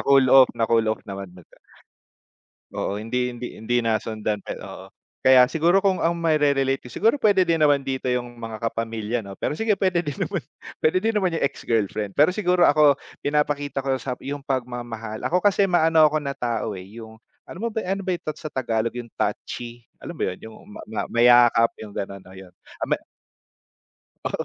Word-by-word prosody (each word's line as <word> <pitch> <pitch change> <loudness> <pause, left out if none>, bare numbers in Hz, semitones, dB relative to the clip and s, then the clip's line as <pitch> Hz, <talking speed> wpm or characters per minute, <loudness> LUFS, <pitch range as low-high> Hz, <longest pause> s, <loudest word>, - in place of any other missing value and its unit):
na-cool 135 -1 +4
off, 135 -1 +7
na-cool 115 0 +2
off - - -3
naman 100 -2 -7
na 90 - -14
siya. - - -24 1.2
Oo, 100 - -2
hindi 125 +3 -1
hindi 120 +1 -6
hindi 120 +2 0
nasundan 110 -1 -1
pa, - - -6
eh, - - -11
oo. - - -9 0.4
Kaya 130 -1 +7
siguro 170 +4 +3
kung 195 -2 +2
ang 170 - +2
maire-relate 140 -5 +1
ko, - - -7
siguro 225 +7 +2
puwede 205 -7 +3
din 165 - +3
naman 145 -3 +3
dito 135 -1 -4
yung 120 -1 -2
mga 115 -1 -7
kapamilya, 115 0 -3
'no. 100 - -8
Pero 150 - -2
sige, 225 -1 +2
puwede 185 -3 0
din 145 - -3
naman - - -2 0.4
pwede 160 +4 +3
din 225 +2 0
naman 185 -4 0
yung - - -2
ex-girlfriend. 105 -5 -2
Pero 150 +3 +5
siguro 180 -2 0
ako, 145 -2 +6 0.3
pinapakita 145 -1 0
ko 135 0 0
sa 130 0 -4
yung 140 0 -6
pagmamahal. 120 -4 -4
Ako 180 +2 +1
kasi, 200 0 +3
maano 165 -3 +4
ako 155 0 +2
na 140 -1 -5
tao, 115 -4 -2
eh, 90 - -9 0.2
yung 110 0 -12 0.3
alam 180 - -10
mo 235 - -1
ba, - - -8
ano 195 +2 -2
ba 190 - -3
yung 170 - -6
tat 155 - -4
sa 155 - -5
Tagalog, 115 -3 -1
yung 120 -1 -7
touchy? 120 -1 -4 0.2
Alam - - -8
mo - - -7
yun, 90 - -7
yung 110 - -14
ma - - -10
ma 110 - -2
mayakap, 120 -1 +5
yung 105 -2 -9
gano'n, 100 0 -5
o, 95 - -14
yun. 95 -1 -12 0.3
Ah, - - -2
me - - +2 1.3
Oo. - - -2
130 Hz, 200 wpm, -23 LUFS, 115-160 Hz, 1.3 s, off